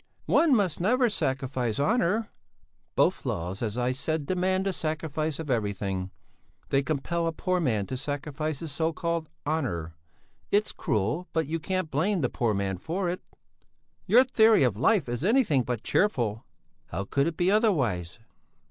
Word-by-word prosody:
"One 315 -5 +4
must 195 -8 +1
never 240 +5 +3
sacrifice 130 - -1
honour." 215 +4 +1 0.6
"Both - - +2
laws, 90 +4 -3
as 110 -1 -2
I 125 0 +1
said, 145 +3 -2
demand 185 +2 0
the 195 - 0
sacrifice 155 -2 -2
of 155 -4 -4
everything 100 -4 -1 0.6
they 135 - +3
compel 160 +4 -1
a - - +1
poor 180 +3 -1
man 115 - 0
to 130 - -5
sacrifice 145 +2 -3
his 165 -3 -5
so 160 +3 0
called 170 -1 -2 0.2
honour. 115 - -2 0.6
It's 210 +1 +2
cruel, 115 - -1
but 160 -1 +1
you 165 +4 -2
can't 185 0 -2
blame 175 +6 +1
the 125 - +1
poor 115 -4 0
man 95 -2 -2
for 175 - -2
it." 180 - -5 0.9
"Your 240 +7 +7
theory 220 - +5
of 120 -6 +2
life 160 - +2
is 120 +3 -3
anything 205 - +3
but 120 -2 -3
cheerful." 120 - +1 0.4
"How 85 +4 -3
could 140 +9 0
it 165 - -3
be 180 +2 +2
otherwise?" 135 - +1
155 Hz, 160 wpm, -27 LUFS, 120-185 Hz, 0.9 s, Your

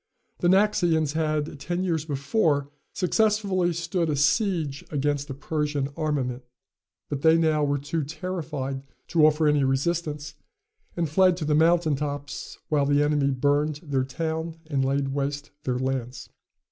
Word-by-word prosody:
The 175 - +1
Naxians 175 -6 +3
had, 155 -2 -1
ten 175 +5 -2
years 165 -4 -1
before, 145 0 0 0.2
successfully 200 -2 +1
stood 170 0 -1
a 150 - +1
siege 155 -1 +1
against 145 0 -1
a 135 - -4
Persian 145 -1 -2
armament, 135 -6 -1 0.7
but 140 -1 -3
they 160 +1 +5
now 155 -2 +2
were 145 0 +1
too 145 +3 -2
terrified 150 -4 -4 0.3
to 155 -2 +5
offer 155 0 +2
any 150 -1 +3
resistance, 150 +2 -1 0.6
and 170 -1 +1
fled 180 +3 +4
to 160 - -3
the 150 - +1
mountain 160 0 +4
tops, 145 0 -5
while 145 -2 +1
the 145 0 +3
enemy 145 -2 +2
burned 145 +3 +1
their 140 -4 0
town 160 +4 -3
and 140 -4 0
laid 135 +1 0
waste 140 +1 -3
their 125 -1 0
lands. 130 -1 -3
150 Hz, 145 wpm, -26 LUFS, 140-165 Hz, 0.7 s, they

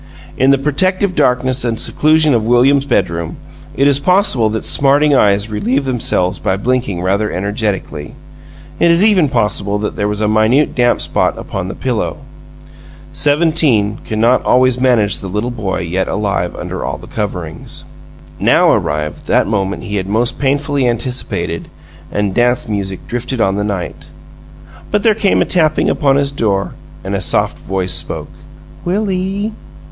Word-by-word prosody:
In 130 - +2
the 140 - +5
protective 185 +7 +1
darkness 130 -2 +1
and 115 -2 -1
seclusion 155 -1 +3
of 115 -2 0
William's 135 +4 +3
bedroom, 85 - -1 0.4
it 140 - +3
is 140 -1 +3
possible 180 - +2
that 110 +1 -3
smarting 145 +2 +3
eyes 100 -5 +3
relieved 120 +6 -1
themselves 100 -7 0
by 95 -2 -1
blinking 115 -5 -1
rather 100 +3 0
energetically; 100 -6 -3 0.6
it 170 - +4
is 170 +3 +4
even 185 -9 +3
possible 105 -4 0
that 105 0 -3
there 105 - 0
was 105 0 -2
a 105 - +1
minute 110 +7 +2
damp 120 -1 +2
spot - - 0
upon 95 -1 -5
the 95 - -6
pillow. 125 -4 -2 1.0
Seventeen 145 -8 +2
cannot 115 +3 +1
always 130 0 +3
manage 120 -5 +2
the 95 - -7
little 105 +6 -2
boy 100 -6 -3
yet 90 +2 -2
alive 100 -4 -2
under - - -5
all - - -3
the - - -13
coverings. - - -5 0.6
Now - - +4
arrived 75 0 -2
that - - +3
moment 100 -2 -2
he 105 0 -3
had 95 -1 -3
most 115 +4 0
painfully 140 -1 0
anticipated, 120 +2 -3 0.4
and 105 -2 -1
dance 120 +2 +1
music 100 -3 -4
drifted 120 +1 -4
on 95 -3 +2
the 105 - -1
night; 100 -4 -4 0.8
but 210 -1 0
there 225 - +4
came 205 -2 +2
a - - -6
tapping 155 -4 +2
upon 140 -2 +2
his 140 0 +1
door 100 -7 -1 0.3
and - - -4
a - - -1
soft - - 0
voice 95 -1 -2
spoke. - - -1 0.5
"Will 200 +3 -1
ee?" 195 +3 -2
120 Hz, 160 wpm, -15 LUFS, 100-140 Hz, 1.0 s, the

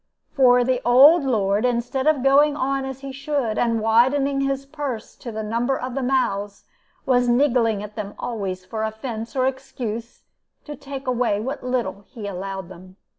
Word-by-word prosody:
"For 250 -3 +5
the 255 0 0
old 280 +7 +7
lord, 205 -4 +1
instead 250 +3 0
of 300 -5 +3
going 285 +2 +4
on 270 0 -1
as 265 0 -7
he 275 -1 -6
should, 275 -4 -2
and 230 -1 +1
widening 260 +5 +2
his 275 0 -1
purse 275 -6 -5
to 235 - -7
the 220 0 -4
number 235 +5 0
of 255 0 -5
the 270 - -2
mouths, 205 -6 -1 0.4
was 245 -2 +3
niggling 240 -5 +2
at 210 0 -9
them 205 -2 -6
always 190 -6 -4
for 220 +4 -4
offense 220 +2 -5
or 255 -1 +2
excuse, 240 -3 -5 0.4
to 295 - -7
take 275 0 -8
away 245 -5 +1
what 265 +6 -4
little 225 -6 -2
he 225 -5 -9
allowed 195 -1 -5
them. 185 +1 -13
245 Hz, 175 wpm, -22 LUFS, 220-270 Hz, 0.4 s, old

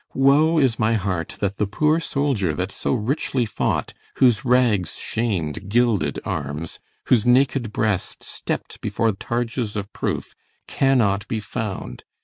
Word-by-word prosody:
Woe 145 +5 +4
is 130 -6 +2
my 110 0 +3
heart 95 -5 -2
That 100 0 -1
the 105 - 0
poor 150 +10 +2
soldier 135 - 0
that 90 +2 -2
so - - -1
richly 125 +1 0
fought, 105 - -1 0.2
Whose 120 -5 +4
rags 120 -8 +2
sham'd 95 -6 -2
gilded 110 -10 +2
arms, 75 +3 -4 0.3
whose 115 -5 +4
naked 125 -2 +3
breast 105 -3 -1
Stepp'd - - -5
before 115 -1 +1
targes 115 +2 -3
of 100 -1 -5
proof, - - -3 0.3
cannot 115 -7 +2
be 110 - -2
found. 105 -1 -5
110 Hz, 135 wpm, -22 LUFS, 100-130 Hz, 0.3 s, Woe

